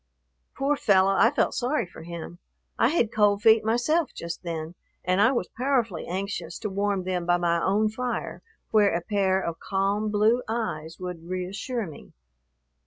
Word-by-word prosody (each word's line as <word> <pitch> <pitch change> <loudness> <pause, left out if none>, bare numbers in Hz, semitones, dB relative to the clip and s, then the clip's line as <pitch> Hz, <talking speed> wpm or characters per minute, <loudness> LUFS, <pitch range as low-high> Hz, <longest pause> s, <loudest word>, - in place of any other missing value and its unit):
Poor 280 +2 +1
fellow, 195 -6 +4
I 225 - +5
felt - - +1
sorry 255 +2 0
for 170 - -13
him. 170 +1 -8 0.4
I - - +5
had 245 -6 +1
cold 205 -1 +3
feet 220 0 +6
myself 245 +8 +1
just 170 0 -6
then, 165 -2 -5 0.3
and 185 +2 +2
I 225 - +5
was 240 -9 -1
powerfully 245 -7 0
anxious 195 +3 -4
to 210 -3 -3
warm 200 -1 0
them 180 -1 -2
by 175 0 +4
my 170 -1 +1
own 210 +3 +2
fire 245 +3 -4 0.3
where 205 -4 +4
a 170 - 0
pair 190 0 +1
of 170 -3 -4
calm 200 +2 0
blue 215 +4 +3
eyes 170 -8 -3
would 180 -2 -7
reassure 200 +6 -3
me. 155 -5 -12
200 Hz, 170 wpm, -26 LUFS, 175-225 Hz, 0.4 s, feet